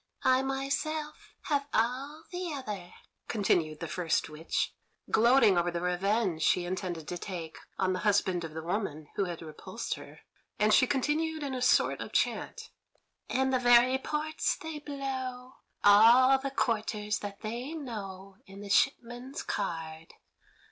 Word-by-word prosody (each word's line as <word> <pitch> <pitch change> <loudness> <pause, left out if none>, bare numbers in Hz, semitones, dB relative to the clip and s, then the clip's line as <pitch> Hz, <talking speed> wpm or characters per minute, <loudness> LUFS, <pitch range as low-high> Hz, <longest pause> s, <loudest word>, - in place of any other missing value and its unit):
"I 260 0 +4
myself 280 +3 -3
have 285 -2 -1
all 265 +7 -1
the 355 -1 -4
other," 210 -10 -6 0.4
continued 165 -8 0
the - - -3
first 170 -3 -1
witch, 155 +2 -2 0.4
gloating 230 -5 +5
over 175 0 +1
the 170 0 -3
revenge 180 0 0
she 175 +2 +3
intended 175 -3 -4
to 175 - -4
take 170 -5 -6 0.2
on 185 -1 +1
the 185 - -2
husband 195 -4 +1
of 160 -1 -7
the 160 - -5
woman 165 -5 -3
who 200 - +1
had 175 -2 -6
repulsed 155 -2 -5
her, - - -11 0.4
and 210 0 +3
she 255 - +6
continued 305 +4 0
in 275 -2 -3
a 255 - -3
sort 250 - +3
of - - -7
chant: - - -1 0.6
"And 265 0 +1
the 255 - +3
very 245 +1 +5
ports 305 +3 -1
they 320 -2 -6
blow, 260 -3 -5 0.3
All 235 +6 +7
the 275 +1 -3
quarters 215 -4 -1
that 200 -1 -7
they 240 +7 -4
know 195 -9 -7
In 195 +1 -11
the 205 - -8
shipman's 250 +2 0
card. 165 -4 -4
220 Hz, 150 wpm, -30 LUFS, 185-265 Hz, 0.6 s, All